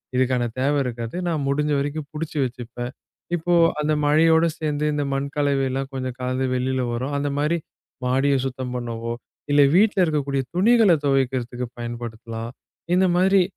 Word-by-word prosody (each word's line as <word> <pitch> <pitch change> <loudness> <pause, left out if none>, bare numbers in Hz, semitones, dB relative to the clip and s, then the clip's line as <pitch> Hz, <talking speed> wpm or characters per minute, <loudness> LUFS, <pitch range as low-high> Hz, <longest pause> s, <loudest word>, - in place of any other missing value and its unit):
இதுக்கான 130 -1 +2 0.2
தேவை 140 +3 +2
இருக்காது. 115 0 -4
நான் 160 -4 0
முடிஞ்ச 150 +2 +1
வரைக்கும் 145 +1 -3
புடிச்சு 155 0 -5
வச்சுப்பேன். 120 0 -6 0.4
இப்போ 175 +1 0 0.3
அந்த 150 +1 +1
மழையோடு 160 +2 +5
சேந்து, 150 -1 -1
இந்த 145 0 0
மண் 135 +1 -1
கலவை 140 -2 +1
எல்லாம் 135 +1 -3
கொஞ்சம் 130 -2 -4
கழந்து 130 +1 -1
வெளியில 130 0 0
வரும். 130 +4 -2
அந்த 145 0 -1
மாரி 150 +4 +1 0.5
மாடிய 135 +2 +2
சுத்தம் 130 -1 -4
பண்ணவோ, 115 -1 -4 0.4
இல்ல 145 0 +6
வீட்டுல 205 +1 +4
இருக்கக்கூடிய 140 -4 0
துணிகளைத் 195 -5 +4
தொவைக்கிறதுக்கு 130 -3 0
பயன்படுத்தலாம். 115 -1 -6 0.5
இந்த 190 +1 +4
மாரி 190 +1 +5
135 Hz, 145 wpm, -23 LUFS, 125-150 Hz, 0.5 s, இல்ல